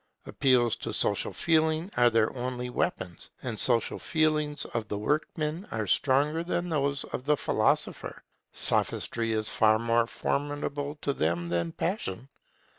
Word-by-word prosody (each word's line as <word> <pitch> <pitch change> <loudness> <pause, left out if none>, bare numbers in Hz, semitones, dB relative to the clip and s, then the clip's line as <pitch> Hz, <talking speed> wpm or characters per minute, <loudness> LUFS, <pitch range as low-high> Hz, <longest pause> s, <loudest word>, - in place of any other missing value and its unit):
Appeals 125 -4 +3
to - - -5
social - - +2
feeling 160 +2 +1
are 120 0 +5
their 115 0 +1
only 125 0 -4
weapons; 90 -7 -3
and 120 -3 -3
the - - +2
social 120 -3 +3
feelings 155 -2 +1
of 115 -2 -4
the 105 - -3
workman 155 - -2
are 110 -1 -2
stronger 145 - +2
than 175 0 -2
those 140 -2 0
of 125 - -6
the 150 0 +3
philosopher. - - 0 0.3
Sophistry 115 -1 -1
is 110 -1 0
far 110 0 +4
more 115 +1 +1
formidable 145 +2 -3
to 140 - +1
them 85 - -1
than 85 -1 -1
passion. 135 - -3
130 Hz, 145 wpm, -28 LUFS, 110-150 Hz, 0.3 s, are